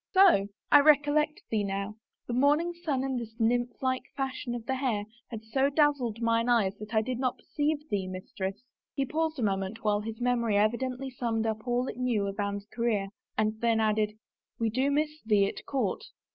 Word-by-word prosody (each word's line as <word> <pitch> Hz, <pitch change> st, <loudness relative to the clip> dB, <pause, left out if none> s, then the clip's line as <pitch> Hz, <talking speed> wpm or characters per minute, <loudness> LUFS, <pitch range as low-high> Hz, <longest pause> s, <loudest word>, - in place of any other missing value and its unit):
So?... 370 Hz, -, +6 dB, 0.2 s
I 290 Hz, -, +9 dB
recollect 295 Hz, +1 st, +3 dB
thee, 215 Hz, -2 st, +1 dB
now. 200 Hz, +1 st, -3 dB, 0.3 s
The 240 Hz, -, -4 dB
morning 295 Hz, +7 st, +3 dB
sun 315 Hz, -7 st, -2 dB
and 265 Hz, -2 st, -1 dB
this 225 Hz, -1 st, -8 dB
nymph 240 Hz, +2 st, 0 dB
like 260 Hz, 0 st, +1 dB, 0.2 s
fashion 265 Hz, -2 st, -3 dB
of 235 Hz, -2 st, -6 dB
the 265 Hz, -, -1 dB
hair 255 Hz, -6 st, 0 dB, 0.3 s
had 225 Hz, -2 st, -7 dB
so 265 Hz, +5 st, +1 dB
dazzled 280 Hz, -6 st, +1 dB
mine 230 Hz, +1 st, +2 dB
eyes 210 Hz, -5 st, +3 dB
that 215 Hz, +2 st, -6 dB
I 220 Hz, -, +4 dB
did 255 Hz, +1 st, -3 dB
not 255 Hz, -1 st, +1 dB
well -, -, -26 dB
perceive 300 Hz, 0 st, -1 dB
thee, 195 Hz, -2 st, 0 dB
mistress." 190 Hz, +3 st, -5 dB, 0.3 s
He 275 Hz, -, +1 dB
paused 315 Hz, +2 st, -1 dB
a 250 Hz, -, -2 dB
moment 195 Hz, +2 st, -1 dB
while 210 Hz, -1 st, +2 dB
his 225 Hz, +1 st, -6 dB
memory 235 Hz, -4 st, +1 dB
evidently 250 Hz, +5 st, 0 dB
summed 230 Hz, -3 st, -1 dB
up 220 Hz, +1 st, -3 dB
all 245 Hz, +1 st, +1 dB
it -, -, -5 dB
knew 245 Hz, -5 st, +1 dB
of 200 Hz, +1 st, -5 dB
Anne's 200 Hz, 0 st, -2 dB
career 215 Hz, -3 st, -1 dB, 0.3 s
and 215 Hz, +1 st, 0 dB
then 230 Hz, -1 st, +3 dB
added, 215 Hz, -1 st, +1 dB, 0.2 s
" -, -, -56 dB
We 225 Hz, -1 st, +1 dB
do 260 Hz, +5 st, +1 dB
miss 300 Hz, +1 st, 0 dB
thee 210 Hz, -3 st, +3 dB
at -, -, -5 dB
court." 255 Hz, -9 st, -1 dB
235 Hz, 200 wpm, -29 LUFS, 215-270 Hz, 0.3 s, I